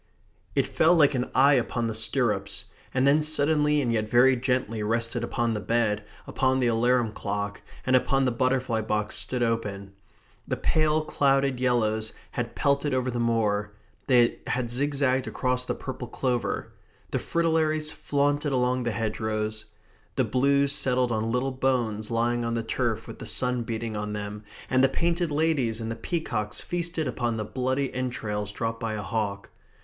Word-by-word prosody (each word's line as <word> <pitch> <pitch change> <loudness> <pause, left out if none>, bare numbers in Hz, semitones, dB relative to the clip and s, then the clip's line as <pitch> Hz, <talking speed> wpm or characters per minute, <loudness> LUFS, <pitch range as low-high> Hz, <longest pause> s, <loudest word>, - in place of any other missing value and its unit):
It - - +3
fell 165 +3 +3
like 150 -3 +5
an 125 -1 -1
eye 140 +3 +6
upon 120 -2 0
the 115 - -1
stirrups, 110 -3 0 0.3
and 130 +1 +1
then 145 +2 +5
suddenly 150 -1 +3
and 120 -2 0
yet 110 -1 -1
very 125 +3 +5
gently 125 -3 -1
rested 115 +2 -1
upon 120 -1 0
the 105 - -2
bed, 110 -1 0 0.2
upon 130 0 +1
the 125 - +2
alarum 120 0 +2
clock, 100 -1 -4 0.2
and 130 - +3
upon 135 +1 +2
the 125 - +2
butterfly 130 -2 +1
box 105 -1 -1
stood 125 -1 -1
open. 105 -4 -2 0.5
The - - -1
pale 155 0 +2
clouded 135 -3 +2
yellows 110 -3 +1 0.2
had 120 -1 -4
pelted 140 -1 +1
over 130 0 0
the 120 - -3
moor; 105 -3 0 0.3
they 120 -3 +4
had 120 -2 -1
zigzagged 135 0 +1
across 125 -1 -1
the - - -2
purple 130 -2 -6
clover. 125 0 -2 0.4
The - - 0
fritillaries 155 -2 +1
flaunted 145 +1 0
along 125 -1 +1
the 120 - -1
hedgerows. 110 -1 -2 0.5
The 130 - +2
blues 140 +4 +2
settled 125 -3 +1
on 110 0 -1
little 125 +3 0
bones 120 -5 0
lying 120 +1 +1
on 115 0 -1
the 115 - -1
turf 110 - -1
with - - -9
the - - -7
sun 125 -1 0
beating 115 -1 -4
on 105 0 -3
them, 105 0 -6 0.2
and 130 0 +3
the 135 - +5
painted 170 +4 0
ladies 145 -7 +1
and 115 0 -4
the - - -3
peacocks 115 - -2
feasted 170 -3 -2
upon 120 -2 -1 0.2
bloody 130 +1 0
entrails 105 -5 -3
dropped 115 +2 -3
by 110 -1 -2
a 105 - -4
hawk. 100 +1 -3
125 Hz, 165 wpm, -26 LUFS, 110-135 Hz, 0.5 s, eye